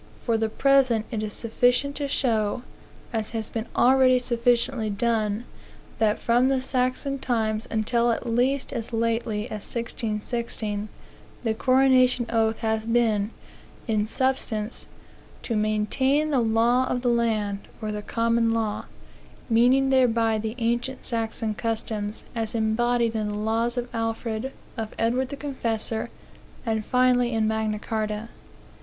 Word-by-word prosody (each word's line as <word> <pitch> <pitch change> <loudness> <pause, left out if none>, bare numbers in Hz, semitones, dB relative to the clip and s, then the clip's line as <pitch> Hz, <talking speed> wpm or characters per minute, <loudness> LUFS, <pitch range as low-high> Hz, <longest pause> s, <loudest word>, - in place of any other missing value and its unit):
For 230 - -1
the 220 0 0
present 260 -3 +3
it 220 -3 -2
is 215 -1 -3
sufficient 245 +6 +1
to 285 -1 -2
show, 225 -4 0 0.5
as 220 -2 0
has 220 -1 -3
been 225 0 -4
already 255 0 +5
sufficiently 240 -1 +1
done, 215 0 0 0.6
that 215 -1 +3
from 240 +2 +3
the 270 -1 +2
Saxon 260 +2 -1
times 225 -3 -1
until 235 +2 +1
at 230 - -2
least 250 +4 0
as 230 0 -4
lately 225 -1 0
as 215 -3 -6
1616, 220 -2 -3 0.5
the 225 -2 +1
coronation 255 0 +4
oath 225 -1 +1
has 220 -1 0
been, 225 -3 +2 0.6
in 215 -2 +1
substance, 240 -3 -1 0.6
to 230 - -2
maintain 240 +8 +1
the 275 - +3
law 235 +3 +3
of 250 0 -2
the - - +1
land, 220 -4 0
or 215 -2 -3
the 210 0 -4
common 230 +1 +1
law, 220 -2 -2 0.7
meaning 255 +4 +4
thereby 230 -4 +3
the 220 +1 -4
ancient 240 +2 -1
Saxon 225 -2 -1
customs, 215 -1 -3
as 225 -1 -3
embodied 230 +1 +1
in 215 -1 -1
the 210 - -3
laws 225 +3 0
of 245 0 -1
Alfred, 225 +2 -2 0.3
of 220 -1 -5
Edward 250 +3 +1
the 280 - -5
Confessor, 230 -6 -2 0.6
and 220 -2 0
finally 250 0 +3
in 220 -2 +1
Magna 220 -1 0
Carta. 215 0 -3
230 Hz, 135 wpm, -25 LUFS, 220-250 Hz, 0.7 s, already